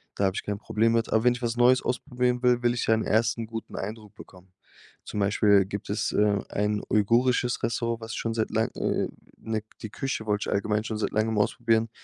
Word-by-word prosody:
Da 100 - +1
habe 95 0 0
ich - - -3
kein 105 -1 -3
Problem 115 +1 +1
mit. 115 0 +1
Aber 110 +1 +2
wenn 125 - +5
ich 125 - -8
was 115 0 -1
neues 125 +1 +5
ausprobieren 125 -1 -1
will, 125 -1 +3
will 120 0 +3
ich 120 - -1
ja 110 - +5
'n 110 - -1
ersten 115 0 +1
guten 115 0 -7
Eindruck 105 +1 -6
bekommen. 95 -3 -15 0.5
Zum 105 - -4
Beispiel 100 -1 +4
gibt 100 +1 -6
es, 105 +1 -1
äh, 105 -1 +2
ein 105 0 -1
uigurisches 120 +4 +2
Restaurant, 115 0 -1
was 115 0 -6
schon 115 -1 -2
seit 110 -1 -1
lang 110 +2 +1
äh, - - 0 0.3
ne, 110 -1 -3 0.2
die 110 - -6
Küche 135 0 -3
wollte 105 -1 0
ich - - 0
allgemein 105 +1 0
schon 110 -3 -3
seit 105 - -2
langem 110 0 0
ausprobieren. 115 +1 +1
110 Hz, 220 wpm, -26 LUFS, 105-120 Hz, 0.5 s, wenn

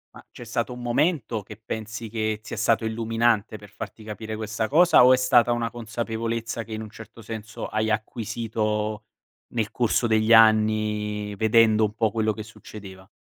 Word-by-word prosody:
Ma - - -14
c'è 120 - -11
stato 120 +1 -3
un 125 - -9
momento 120 - 0
che 105 - -11
pensi 110 +1 -6
che 110 -1 -2
sia 110 +1 -7
stato 110 +2 +2
illuminante 115 -1 0
per 105 0 -14
farti 105 +2 -9
capire 110 +1 -6
questa 110 0 -3
cosa 160 -2 +6
o 130 - +7
è - - +4
stata 125 -1 +4
una 120 -1 -1
consapevolezza 115 0 -4
che, 110 - -9
in 110 - -4
un 110 - -8
certo 115 +1 -13
senso, 110 +1 -7
hai 110 0 -1
acquisito, 110 -1 -2 0.5
nel 110 -3 -1
corso 120 0 +1
degli 110 0 +3
anni 110 -2 +3
vedendo 110 0 +4
un 105 - -4
po' 110 -1 +1
quello 110 0 0
che 110 - -7
succedeva? 100 -3 -12
110 Hz, 175 wpm, -24 LUFS, 110-115 Hz, 0.5 s, o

